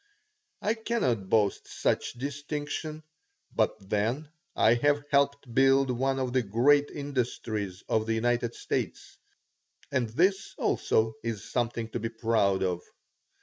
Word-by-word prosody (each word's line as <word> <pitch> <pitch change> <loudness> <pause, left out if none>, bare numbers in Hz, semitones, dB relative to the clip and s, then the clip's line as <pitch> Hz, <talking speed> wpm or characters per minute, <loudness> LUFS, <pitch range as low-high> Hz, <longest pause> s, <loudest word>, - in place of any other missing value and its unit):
I 215 - +2
cannot 135 - -1
boast 105 -3 +2
such - - -1
distinction, 145 +3 -4 0.5
but - - +2
then 115 +10 -1 0.3
I 115 - +5
have 145 +4 +2
helped 140 -3 +1
build 135 +1 +4
up 125 - -2
one 135 +1 +1
of 130 -2 -2
the 130 - +3
great 130 +7 +3
industries 115 -8 -3
of 110 0 +1
the 115 - +1
United 120 +1 0
States, - - -4 0.7
and 120 -3 0
this 190 - +1
also 110 0 +1
is 115 -3 -4
something 115 -2 -1
to 120 - -3
be 115 +1 -2
proud 110 -4 +1
of. 90 -2 -1
120 Hz, 135 wpm, -28 LUFS, 110-140 Hz, 0.7 s, I